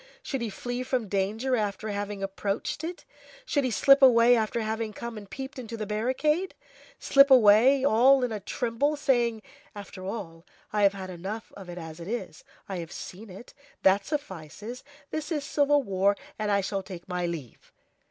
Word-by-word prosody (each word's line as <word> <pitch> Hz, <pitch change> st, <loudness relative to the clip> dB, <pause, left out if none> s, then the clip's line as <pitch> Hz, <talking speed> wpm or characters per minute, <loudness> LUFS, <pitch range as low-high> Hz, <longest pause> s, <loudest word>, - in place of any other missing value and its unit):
should 270 Hz, -3 st, -3 dB
he 230 Hz, -, -2 dB
flee 245 Hz, +4 st, -4 dB
from 255 Hz, -3 st, -1 dB
danger 210 Hz, +7 st, 0 dB
after 215 Hz, -1 st, -2 dB
having 205 Hz, -1 st, -4 dB
approached 195 Hz, +8 st, -3 dB
it? 345 Hz, +2 st, -6 dB, 0.4 s
should 285 Hz, -, +1 dB
he 255 Hz, -, +1 dB
slip 275 Hz, +4 st, +5 dB
away 245 Hz, -2 st, +7 dB
after 225 Hz, +1 st, 0 dB
having 220 Hz, 0 st, -2 dB
come 235 Hz, +2 st, -6 dB
and 205 Hz, -2 st, -10 dB
peeped 265 Hz, +3 st, -7 dB
into 230 Hz, -2 st, -6 dB
the 215 Hz, -, -3 dB
barricade? 260 Hz, -, 0 dB, 0.4 s
slip 275 Hz, 0 st, +5 dB
away, 255 Hz, +3 st, +6 dB
all 260 Hz, +2 st, +5 dB
in 245 Hz, -, -1 dB
a 215 Hz, -, -3 dB
tremble, 245 Hz, +8 st, -1 dB
saying: 240 Hz, -6 st, +1 dB, 0.3 s
"After 200 Hz, -2 st, -9 dB
all, 185 Hz, -5 st, -6 dB, 0.3 s
I 210 Hz, -, +1 dB
have 200 Hz, -1 st, +5 dB
had 190 Hz, -1 st, -7 dB
enough 195 Hz, +5 st, -6 dB
of 190 Hz, -3 st, -10 dB
it 175 Hz, -, -7 dB
as 160 Hz, -1 st, -8 dB
it 170 Hz, -, -8 dB
is. 240 Hz, +4 st, -5 dB, 0.2 s
I 195 Hz, -, -4 dB
have 170 Hz, -1 st, -6 dB
seen 205 Hz, +4 st, -9 dB
it, 190 Hz, +7 st, -12 dB, 0.3 s
that 195 Hz, +1 st, +4 dB
suffices, 220 Hz, -, -6 dB, 0.3 s
this 310 Hz, +1 st, -4 dB
is 300 Hz, -3 st, -1 dB
civil 290 Hz, 0 st, +2 dB
war, 200 Hz, -1 st, +1 dB, 0.2 s
and 210 Hz, -1 st, -1 dB
I 200 Hz, -1 st, +3 dB
shall 195 Hz, +1 st, -2 dB
take 185 Hz, -3 st, -10 dB
my 180 Hz, -1 st, -2 dB
leave!" 155 Hz, -8 st, -8 dB
220 Hz, 180 wpm, -27 LUFS, 195-255 Hz, 0.4 s, away